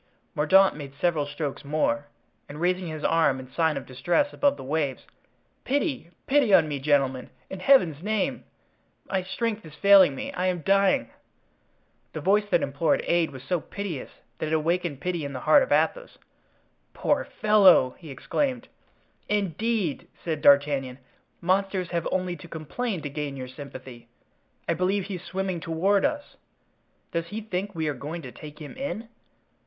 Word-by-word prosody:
Mordaunt 190 +6 +4
made 140 -2 -9
several 160 -5 +1
strokes 145 -1 -4
more, 145 0 0 0.4
and 145 +1 -8
raising 180 +1 0
his 155 -1 -6
arm 160 -5 +2
in 130 0 -11
sign 160 -2 +1
of 135 - -6
distress 175 - 0
above 285 -1 +2
the - - -8
waves: 140 -1 -2 0.6
"Pity, 275 - -1 0.2
pity 270 -5 +3
on 165 -5 +6
me, 145 -2 -3
gentlemen, 135 -2 +1 0.2
in 190 - -5
Heaven's 180 - +4
name! 210 +1 -1 0.6
my 190 - 0
strength 220 +3 -3
is 155 -2 -12
failing 190 -3 +6
me; - - -5
I 180 +1 -1
am 180 -2 -1
dying." 195 -10 +2 1.0
The - - -4
voice 200 +6 +2
that 170 - +2
implored 140 +4 +1
aid 170 -1 +2
was 130 -3 -11
so 180 +4 0
piteous 195 -8 -6 0.3
that - - -2
it 155 - -2
awakened 165 -2 0
pity 180 -3 -2
in 140 0 -5
the 130 - -5
heart - - +6
of - - -2
Athos. - - +1 0.8
"Poor - - +1
fellow!" 195 -11 +5
he 160 - -11
exclaimed. 255 - -2 0.6
"Indeed!" 205 -2 -1 0.2
said 160 -3 -2
D'Artagnan, 140 -2 +4 0.4
"monsters 185 0 0
have 170 -2 -1
only 185 -1 -1
to 170 - -12
complain 170 +5 -4
to 145 - -3
gain 145 -1 -4
your 130 -1 -6
sympathy. 130 -3 -10 0.6
I - - +2
believe 185 +4 0
he's 185 -2 -6
swimming 190 -2 -3
toward 180 +5 +1
us. 290 -1 -3 0.7
Does 170 0 -2
he 210 +5 -5
think 200 -2 -4
we 160 -1 -1
are 150 - 0
going 155 +5 -6
to 130 - -8
take 150 +2 -11
him 150 +5 -9
in? 260 -4 -5
170 Hz, 165 wpm, -26 LUFS, 145-195 Hz, 1.0 s, on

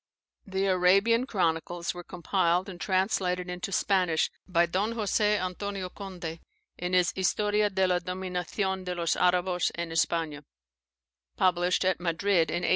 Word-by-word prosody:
[The 190 0 -1
Arabian 195 +6 +3
chronicles 170 -4 -1
were 175 0 -8
compiled 180 +1 0
and 180 -3 -9
translated 185 -2 0
into 180 +2 -5
Spanish 180 -5 +1 0.2
by 170 -2 +3
Don 195 +6 -1
Jose 210 -1 +1
Antonio 185 +1 -4
Conde, 175 -5 -7 0.4
in 180 +1 -3
his 180 -2 +3
"Historia 210 +2 +1
de 190 -1 +1
la 180 -1 +2
Dominacion 185 +1 -3
de 180 -1 -3
los 170 -2 0
Arabos 180 0 +2
an 170 -1 -4
Espana," 165 -2 0 0.9
published 180 0 +2
at 185 -2 +1
Madrid 175 -1 +1
in 175 +2 -2
1820. - - +1
180 Hz, 140 wpm, -28 LUFS, 175-195 Hz, 0.9 s, Arabian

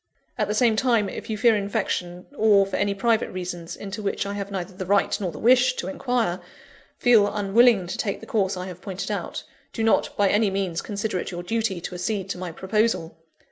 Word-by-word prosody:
At - - 0
the 210 - -1
same 225 0 +3
time, 225 -4 +2
if - - -8
you 215 - -2
fear 225 +1 +4
infection, 195 -4 -2
or 210 -5 +5
for 195 - -5
any 200 -1 0
private 225 +2 +1
reasons 175 -2 -6
(into 205 +2 -6
which 200 0 -2
I 200 - -3
have 200 -1 -4
neither 190 -1 -5
the 185 -1 -6
right 200 +1 +2
nor 180 -3 -1
the - - -10
wish 255 +1 +4
to 180 - -4
inquire) 225 -3 -1 0.6
feel 225 -5 +4
unwilling 210 0 +4
to 175 - -6
take 200 -3 -1
the - - -11
course 195 -4 0
I 180 - -4
have 180 -1 -9
pointed 195 -2 -5
out, - - -4 0.3
do 225 - -2
not 225 - +2
by 205 - +4
any 210 +1 +3
means 190 -3 -2
consider 205 -2 -3
it - - -4
your 175 -1 -6
duty 220 -1 -1
to 180 - -6
accede 190 +2 -2
to 180 - -5
my 180 -2 -5
proposal. 190 -1 0
200 Hz, 220 wpm, -24 LUFS, 185-220 Hz, 0.6 s, or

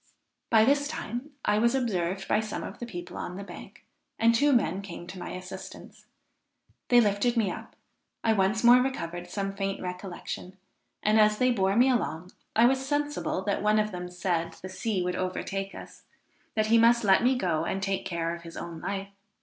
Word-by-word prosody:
By 220 -1 +6
this 285 +2 +3
time 255 -2 -5 0.2
I 210 - +3
was 235 +3 +3
observed 195 -7 -1
by - - +3
some 215 -1 -4
of - - -8
the 240 - -5
people 175 -4 -7
on 180 - -5
the 200 - -6
bank, - - -11 0.3
and 230 +1 +4
two 285 +5 +4
men 200 -7 +2
came 175 -3 -8
to 185 +1 -9
my - - -6
assistance. 185 +1 -9 0.8
They 245 - +6
lifted 225 +2 +2
me 210 -5 +2
up; - - -9 0.5
I 225 - +4
once 205 +2 +1
more 240 +1 +9
recovered 175 -9 -3
some 195 0 -3
faint 195 0 -2
recollection; 180 0 -6 0.5
and, 215 +1 +4
as 210 0 +5
they 255 +2 +3
bore 195 -4 +1
me 245 +3 +5
along, 180 -8 -1 0.2
I 230 - +6
was 265 +2 +3
sensible 290 -8 -1
that 200 0 -1
one 210 +1 +3
of 215 0 +1
them 180 -1 -5
said 180 -2 -1
the 185 - -9
sea 190 0 -2
would 180 0 -1
overtake 195 +1 -3
us; - - -11 0.5
that 215 -1 +2
he 230 - +7
must 235 +1 +5
let 195 -2 +5
me 255 +2 +3
go 165 -7 0
and 190 - -1
take 195 0 -1
care 170 -1 -2
of 170 - -11
his 165 0 -10
own 170 -1 -6
life. 195 0 -3
200 Hz, 200 wpm, -28 LUFS, 180-235 Hz, 0.8 s, more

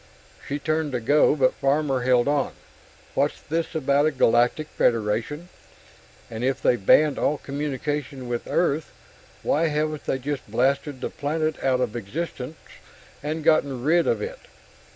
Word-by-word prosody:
She 140 - -2
turned 155 -1 -1
to 125 - 0
go, 145 +6 +4
but 130 -3 +3
Farmer 140 -1 +1
held 125 0 +3
on. 145 -1 +1 0.6
"What's - - 0
this 165 +1 -3
about 145 0 +2
a - - +1
Galactic 125 +3 +2
Federation? 115 +9 0 0.8
And 110 +1 -6
if 135 +1 0
they've 120 -5 +1
banned 150 +7 +5
all 150 - +1
communication 140 -1 -4
with 120 -1 -3
Earth, 155 -3 0 0.5
why 165 +3 +2
haven't 155 0 -2
they - - 0
just 135 -2 -5
blasted 135 +4 0
the - - -3
planet 155 +1 -2
out 130 -1 +2
of 120 - -1
existence 135 - -5 0.6
and 155 +2 -3
gotten 140 -5 +2
rid 165 +4 +3
of - - +1
it? - - -6
145 Hz, 150 wpm, -24 LUFS, 130-155 Hz, 0.8 s, banned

